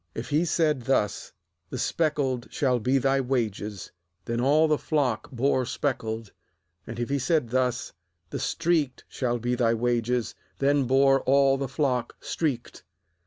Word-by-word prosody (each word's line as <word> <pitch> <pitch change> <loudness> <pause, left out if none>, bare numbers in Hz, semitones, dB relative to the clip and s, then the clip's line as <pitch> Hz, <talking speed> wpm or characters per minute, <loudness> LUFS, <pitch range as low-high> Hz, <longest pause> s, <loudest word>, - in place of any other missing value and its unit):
8If 115 - -5
he 155 +4 +2
said 155 -5 +1
thus: 105 -6 0 0.4
The - - -5
speckled 135 -2 0
shall 130 -3 +1
be 130 +5 +2
thy 135 +1 +2
wages; 110 -6 -3 0.3
then 115 +1 -1
all 150 +5 +4
the 150 -1 +1
flock 130 -8 -1
bore 130 +1 +1
speckled; 115 -5 -3 0.6
and 115 +1 -6
if 120 - -2
he 140 0 0
said 145 -2 +1
thus: 125 -1 0 0.4
The - - -3
streaked 160 -6 0
shall 120 -2 -1
be 120 +1 -1
thy 115 -2 +2
wages; 120 0 0 0.2
then 140 0 +2
bore 135 +1 +4
all 135 0 +4
the 135 0 -2
flock 130 -3 -1
streaked. 135 - -3
130 Hz, 150 wpm, -26 LUFS, 120-140 Hz, 0.6 s, all